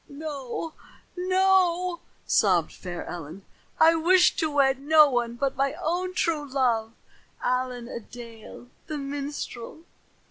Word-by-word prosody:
"No, 290 0 -5 0.4
no," 365 -1 +2 0.3
sobbed 180 -6 +2
fair 175 -2 -7
Ellen. 175 +2 -8 0.3
"I 325 +1 +7
wish 350 +3 +4
to 315 - +1
wed 270 -2 +2
no 305 +2 +6
one 240 -3 -1
but 275 +2 -1
my 275 +1 0
own 365 +2 -2
true 325 -5 0
love, 235 -4 0 0.5
Allen 250 -1 -1
a 240 - -6
Dale 235 +1 -12 0.2
the 305 - -4
minstrel." 280 -1 -6
275 Hz, 120 wpm, -26 LUFS, 240-325 Hz, 0.5 s, I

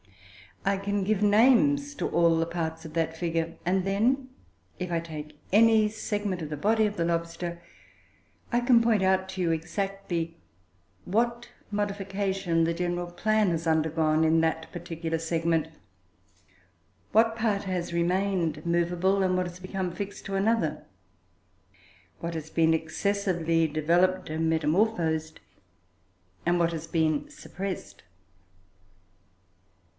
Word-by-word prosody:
I 195 0 +2
can 200 0 -1
give 210 +1 0
names 270 +7 +4
to - - -2
all 170 -1 +3
the 165 - +1
parts 165 -1 -4
of 155 - -9
that 165 0 -1
figure, 165 -1 -2
and 185 +1 +1
then 240 +8 +1 0.5
if 180 -1 -4
I 170 - +1
take 155 -2 -8
any 220 +1 +5
segment 205 -3 -3
of 155 - -5
the 150 - -4
body 220 +7 +2
of 210 0 -2
the 170 - +1
lobster, 170 +1 -3 0.9
I 240 - +2
can 240 -1 +5
point 230 -3 +3
out 190 0 +2
to 190 0 -4
you 170 -2 +2
exactly, 175 0 -3 0.7
what 235 +4 0 0.2
modification 195 -4 -1
the 165 +1 +1
general 175 0 -2
plan 215 +3 +2
has 165 0 -2
undergone 160 0 +2
in 160 +1 +4
that 160 0 -1
particular 165 -2 -4
segment; 165 0 0 1.4
what 225 +1 +4
part 215 -3 0
has 180 -3 -3
remained 170 -3 0
movable, 175 +3 +1
and 185 -1 +2
what 180 0 0
has 175 +1 -10
become 185 -1 -3
fixed 200 +2 -6
to 195 - -3
another; 225 +4 +1 1.4
what 170 0 -4
has 160 -1 -5
been 160 0 +3
excessively 165 -1 0
developed 170 +5 +1
and 160 +1 0
metamorphosed 160 -1 +1 1.1
and 175 +1 +2
what 170 0 +2
has 165 -1 -5
been 160 - 0
suppressed. 190 - -7
175 Hz, 130 wpm, -27 LUFS, 165-200 Hz, 1.4 s, any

